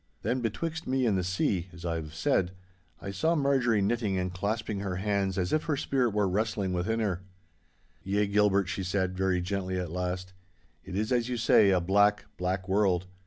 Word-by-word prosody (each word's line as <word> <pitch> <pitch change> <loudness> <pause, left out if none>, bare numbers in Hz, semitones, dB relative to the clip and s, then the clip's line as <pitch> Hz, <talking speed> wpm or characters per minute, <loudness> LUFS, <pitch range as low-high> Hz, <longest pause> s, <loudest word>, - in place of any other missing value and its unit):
Then 130 0 0
betwixt 160 +8 -3
me 130 -1 +1
and 110 -4 +2
the 95 - 0
sea 95 0 0
(as 85 0 -10
I 85 - 0
have 75 -1 -7
said) 90 +2 +1 0.5
I 100 - -4
saw 160 +13 +1
Marjorie 130 -8 +2
knitting 105 -2 0
and 90 0 -2
clasping 105 +2 -2
her 100 -2 -3
hands 95 -1 0
as 90 -1 -1
if 155 - +1
her 150 -3 0
spirit 130 -3 +1
were 105 -1 +1
wrestling 100 -1 -1
within 105 +6 0
her. 95 -4 -1 0.8
'Yea, 100 +3 +1
Gilbert,' 100 -1 +3
she 95 +1 -3
said, 95 0 -1
very 95 -1 +1
gently 95 0 -2
at 90 -3 -4
last, 90 +1 -3 0.5
'it 95 - -7
is 110 +4 -1
as 120 -1 +1
you 125 - -1
say, 110 -3 +5
a 95 -1 +4
black, 100 +3 +3
black 95 +1 -2
world. 95 -2 +2
100 Hz, 195 wpm, -29 LUFS, 90-110 Hz, 0.8 s, say